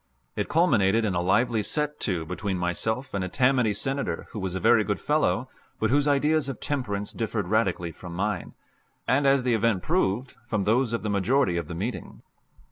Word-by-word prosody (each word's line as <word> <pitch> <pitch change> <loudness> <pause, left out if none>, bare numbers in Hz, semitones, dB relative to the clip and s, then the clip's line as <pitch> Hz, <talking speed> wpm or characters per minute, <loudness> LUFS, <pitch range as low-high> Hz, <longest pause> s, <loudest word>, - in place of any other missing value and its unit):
It - - -2
culminated 115 - +3
in 100 - 0
a 85 - 0
lively 110 +5 +2
set 150 +8 0
to 90 -5 -1
between 95 +3 -3
myself 110 +9 -2
and 100 -1 -1
a 95 - -3
Tammany 125 0 +2
Senator 135 +6 -1
who 110 - -6
was 95 -2 -3
a - - -1
very - - +4
good - - -2
fellow, - - +1 0.3
but 110 +1 +1
whose 145 +1 +3
ideas 145 0 +2
of 135 - -6
temperance 105 -8 -3
differed - - -2
radically 85 -1 0
from 85 +1 -10
mine, 100 0 -3 0.5
and, 140 +3 +3
as 135 -1 +4
the 125 -1 +1
event 110 -4 +1
proved, 130 - -1
from 105 -3 -1
those 115 +4 +2
of 115 - -2
the 105 - -2
majority 100 +1 +2
of 85 -3 -3
the 85 - -6
meeting. 105 +8 -5
110 Hz, 195 wpm, -26 LUFS, 95-135 Hz, 0.5 s, very